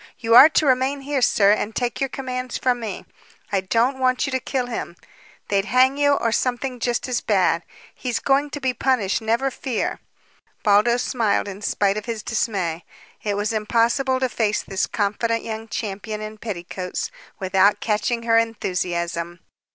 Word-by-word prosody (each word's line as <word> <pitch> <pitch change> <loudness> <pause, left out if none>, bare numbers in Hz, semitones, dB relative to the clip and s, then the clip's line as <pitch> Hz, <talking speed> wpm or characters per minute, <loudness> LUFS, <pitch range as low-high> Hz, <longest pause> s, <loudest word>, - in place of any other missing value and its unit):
You 230 0 0
are 270 +6 +10
to 310 - +2
remain 265 +1 +2
here, 275 -1 -1
sir, 200 -4 +4
and 215 +1 0
take 245 -2 -2
your 270 - 0
commands 255 -1 -4
from 250 -1 +1
me. 220 -4 -6 0.5
I 195 -2 +1
don't 235 +7 +1
want 255 +1 +2
you 290 - -3
to 260 - 0
kill 255 0 -2
him. 230 -7 -5 0.5
They'd 200 -1 +1
hang 255 +4 +4
you 285 0 +3
or 230 -5 +1
something 250 +2 -1
just 240 +3 -1
as 250 -1 -1
bad. - - +2 0.3
He's 245 -3 -3
going 280 +2 +1
to 290 - -6
be 260 -2 0
punished, 240 -5 +1
never 235 +5 0
fear!" 250 -2 -3 0.6
Baldos 225 +4 +4
smiled 220 -5 0
in 200 0 -7
spite 200 0 +1
of 215 - -5
his 230 -3 -4
dismay. 185 -7 -2 0.4
It 205 -1 -2
was 210 +2 -1
impossible 235 +5 +1
to 260 - +2
face 220 -3 0
this 195 0 -2
confident 230 +2 -1
young 220 0 -5
champion 210 0 -4
in 215 0 -7
petticoats 190 - -5 0.3
without 190 +1 +3
catching 230 +2 -1
her 230 -1 +4
enthusiasm. 175 -5 -2
230 Hz, 170 wpm, -22 LUFS, 205-255 Hz, 0.6 s, are